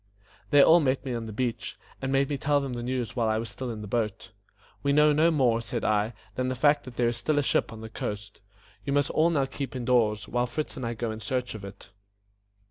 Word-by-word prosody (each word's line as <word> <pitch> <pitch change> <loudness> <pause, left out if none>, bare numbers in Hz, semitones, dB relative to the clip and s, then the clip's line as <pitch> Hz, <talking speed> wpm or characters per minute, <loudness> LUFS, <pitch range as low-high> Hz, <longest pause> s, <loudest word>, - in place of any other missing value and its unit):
They 145 -1 +7
all 165 +2 +7
met 135 -3 0
me 130 - -2
on 115 -1 -4
the - - -6
beach, 115 +1 -3 0.2
and 130 0 -2
made 135 0 +3
me 145 - -2
tell 145 +1 +2
them 135 -2 -4
the 120 - -4
news 125 -1 -3
while 115 -3 +1
I 110 - +1
was 115 +1 -3
still 130 -1 -5
in 110 -2 -5
the - - -7
boat. 110 -2 -2 0.5
"We 140 0 +1
know 150 +1 +5
no 155 +3 +4
more," 125 -7 +2
said 115 0 -3
I, 110 +1 +1 0.2
"than 130 +3 -1
the 130 - -1
fact 145 +2 +3
that 130 -2 -10
there 120 -1 +2
is 120 - -3
still 155 -1 0
a 145 - +3
ship - - +1
on 110 -1 -9
the 110 - -7
coast. 105 -2 -6 0.4
You 140 - -2
must 145 0 +2
all 160 +2 +3
now 145 -5 +1
keep 135 -2 -6
in 125 -2 -4
doors, 110 -4 +2
while 120 0 0
Fritz 155 +4 -3
and 125 -3 -4
I 115 - -3
go 115 0 -2
in 110 - -6
search 125 +3 -2
of 110 -3 -8
it." 100 0 -11
125 Hz, 260 wpm, -27 LUFS, 110-140 Hz, 0.5 s, They